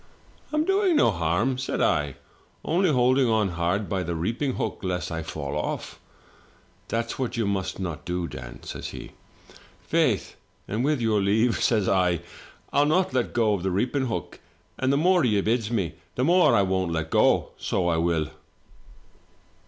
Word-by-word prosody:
" - - -30
'I'm 305 +1 +1
doing 390 -2 +2
no 115 - +4
harm,' 90 +10 0
said 130 - -2
I, 75 -2 +1 0.5
'only 180 +3 +2
holding 130 -1 +3
on 110 -3 +2
hard 90 +4 -1
by 95 -2 -1
the 85 -1 -3
reaping 115 - -1
hook - - -3
lest 90 -2 -2
I 80 -1 -3
fall 75 -3 -5
off.' - - -4 0.5
" - - -33
'That's 115 +2 -3
what 125 -2 -2
you 115 - +1
must 100 -2 -2
not 85 -4 -4
do, 90 0 -2
Dan,' - - -9
says - - -6
he. - - -8 0.7
"'Faith, - - 0 0.3
and 110 +4 -1
with 145 -2 +1
your 110 -3 +2
leave,' 110 +5 +2
says 110 -5 +2
I, 90 -3 +2 0.5
'I'll 145 +1 +4
not 185 +4 +2
let 125 -2 0
go 110 -4 +2
the 95 +2 -1
reaping 125 +8 0
hook, 115 - -5 0.4
and 130 0 +2
the 140 - +2
more 180 +2 +4
you 110 -5 +3
bids 115 -1 0
me, 95 -8 -1 0.2
the 125 - 0
more 175 -5 +5
I 100 - +4
won't 95 -2 0
let 80 -1 -2
go - - +3
— - - -33
so 90 -3 -1
I 85 -1 +2
will.' 80 -2 0
105 Hz, 180 wpm, -25 LUFS, 90-130 Hz, 0.7 s, more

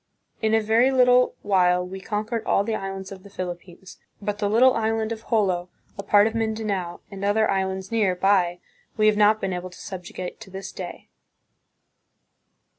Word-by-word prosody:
In 220 0 +2
a 225 - +3
very 225 +4 +3
little 250 -1 +4
while 180 -2 +3
we 190 +1 -8
conquered 215 +3 -3
all 200 - +3
the 225 +2 -2
islands 195 -2 -5
of 190 -1 -9
the 200 - -14
Philip 180 -3 -5
pines; 180 0 -15 0.2
but 205 0 -3
the 205 -1 0
little 250 +4 +5
island 225 0 -1
of 225 0 -6
Jolo, 185 -6 +1 0.3
a - - -5
part 205 +1 +4
of 225 - 0
Mindanao, 220 -2 -1
Moro 175 0 -9
"Vinta." - - -35
and 195 0 -7
other 215 +2 +2
islands 190 0 -2
near 210 -5 +2
by 180 -2 +2 0.4
we 215 - +3
have 215 0 +5
not 210 +1 +4
been 190 -2 -2
able 180 +1 -5
to 180 - -15
subjugate 180 -1 -7
to 225 - -11
this 195 +1 -7
day." - - -8
205 Hz, 190 wpm, -24 LUFS, 190-220 Hz, 0.4 s, little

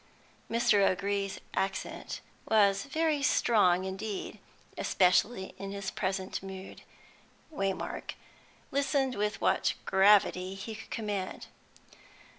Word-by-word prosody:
Mr. 230 -3 +3
O'Gree's 195 +1 0
accent 195 0 -3 0.3
was 200 -1 +4
very 310 +1 0
strong 200 -10 +3
indeed, 195 +2 -5 0.4
especially 190 +2 +2
in 195 0 -5
his 200 -1 -4
present 190 0 -2
mood. 190 0 -9 0.7
Waymark 195 -8 -3 0.6
listened 275 -2 +1
with 210 -1 -1
what - - +2
gravity 190 -1 +4
he 195 +3 -6
could 220 - -10
command. 205 -4 -3
200 Hz, 95 wpm, -30 LUFS, 190-220 Hz, 0.7 s, was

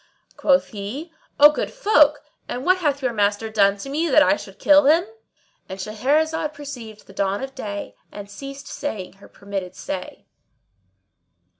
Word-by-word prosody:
Quoth 275 -1 +2
he, 245 +11 -7 0.3
"O 295 +1 +9
good - - -3
folk, 305 -12 +3 0.3
and 255 +3 -4
what 370 +1 +4
hath 285 -5 -1
your 250 -2 0
master 205 +1 0
done 200 -2 +3
to 200 - -8
me 310 +5 -1
that 300 +2 +6
I 295 - +4
should 195 -9 -11
kill 295 -1 +5
him?"— 330 +5 +5 0.6
And 190 - -6
Shahrazad 300 +9 0
perceived 245 -7 -9
the 195 - -15
dawn 200 +3 -1
of 270 0 -6
day 205 -6 -6 0.2
and 205 -1 -9
ceased 275 +7 -9
saying 215 -10 -5
her - - -13
permitted 195 -2 -6
say. 185 -1 -7
265 Hz, 160 wpm, -22 LUFS, 205-295 Hz, 0.6 s, O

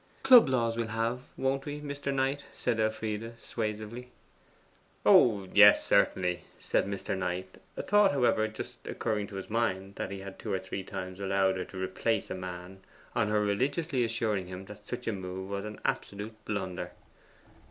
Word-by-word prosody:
'Club 250 - +9
laws 115 -3 +1
we'll 115 -1 -1
have, 115 +3 -1 0.2
won't 135 +1 0
we, 145 0 -4
Mr. 140 -1 -4
Knight?' 135 +1 0
said 120 -3 -1
Elfride 110 +1 -2
suasively. 110 +2 -4 1.0
'Oh 100 -5 +6
yes, 105 0 +8
certainly,' 90 -1 +2 0.2
said - - 0
Mr. 100 -1 -3
Knight, 95 0 -4 0.2
a - - -2
thought, 205 -1 +5
however, 120 -5 +2
just 120 +2 -8
occurring 105 -3 -1
to 100 - -10
his 95 - -5
mind, 100 -4 -1
that - - -3
he 100 0 -6
had 95 0 -9
two 110 - -4
or 95 - +2
three 95 +1 -5
times 95 0 -6
allowed 95 -1 +2
her 90 - -3
to 95 - -11
replace 95 +4 -1
a - - 0
man 90 0 -7 0.3
on - - +1
her 105 0 +2
religiously 130 +7 0
assuring 110 -5 -1
him 90 +1 -7
that 105 +1 -11
such 125 +3 -6
a - - +1
move 95 -1 -5
was 100 +1 -3
an 105 0 -7
absolute 105 +2 -2
blunder. 95 -4 -3
105 Hz, 175 wpm, -30 LUFS, 95-120 Hz, 1.0 s, Club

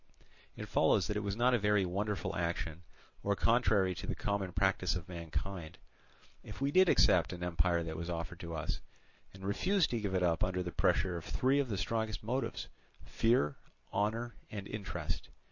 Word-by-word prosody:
It - - -6
follows 95 - +3
that 105 - -2
it - - +1
was 100 -1 -2
not 125 +3 +3
a 120 - +4
very 105 -1 +3
wonderful 100 +3 -2
action, 85 -1 -2 0.4
or 100 0 +1
contrary 105 -5 +3
to - - -7
the - - -1
common 100 -3 -1
practice 95 0 +1
of 90 -2 -5
mankind, 85 0 -5 0.7
if - - -9
we 140 +1 +1
did 185 +2 +6
accept 90 0 +4
an 90 0 -6
empire 85 0 +1
that 80 -1 -5
was 85 +1 -4
offered 85 0 -4
to 85 -1 -5
us, 75 - -2 0.5
and 95 0 -10
refused 185 - +2
to 120 - 0
give 100 -2 -1
it 90 - +2
up 85 -2 +2
under 90 0 0
the 90 - -4
pressure 90 +1 +2
of 85 - -7
three 135 +2 +2
of 135 -3 0
the 100 - -1
strongest 110 0 -2
motives, 125 +5 -2 0.4
fear, 115 - +2 0.4
honour, 110 +4 0 0.2
and 100 -2 -6
interest. 105 -2 -4
95 Hz, 185 wpm, -33 LUFS, 85-110 Hz, 0.7 s, did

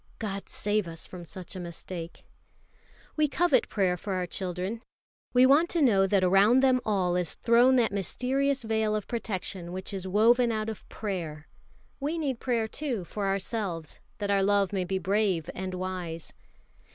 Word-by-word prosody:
God 200 -3 -5
save 210 -2 0
us 165 0 -6
from 175 -2 -10
such 185 +2 -8
mistake! 170 -1 -7 0.9
We 305 -1 +3
covet 290 -3 +2
prayer 190 -4 +1
for 195 +3 -4
our 185 -1 -1
children. 185 +5 -4 0.5
We 250 +1 +6
want 295 +6 +5
to 340 - 0
know 195 -7 +4
that 195 -1 +2
around 200 +8 +5
them 255 -1 +4
all 185 -4 +1
is 180 -3 +1
thrown 240 +3 +4
that 240 -3 +3
mysterious 260 +7 0
veil 220 -1 0
of 210 - -3
protection 190 -6 -4
which 185 +2 -6
is 190 -1 -4
woven 235 +5 +4
out 215 0 -2
of 220 - -8
prayer. 165 -8 -5 0.5
We 295 +4 -2
need 275 -7 -2
prayer, 235 -3 0
too, 250 -5 -3
for 200 +3 -3
ourselves, 195 -4 -3 0.2
that 205 -1 -2
our 200 -1 +3
love 200 0 +2
may 185 -2 0
be 190 +1 -1
brave 190 -3 0
and 185 0 -4
wise. 180 -3 -5
200 Hz, 165 wpm, -28 LUFS, 185-235 Hz, 0.9 s, We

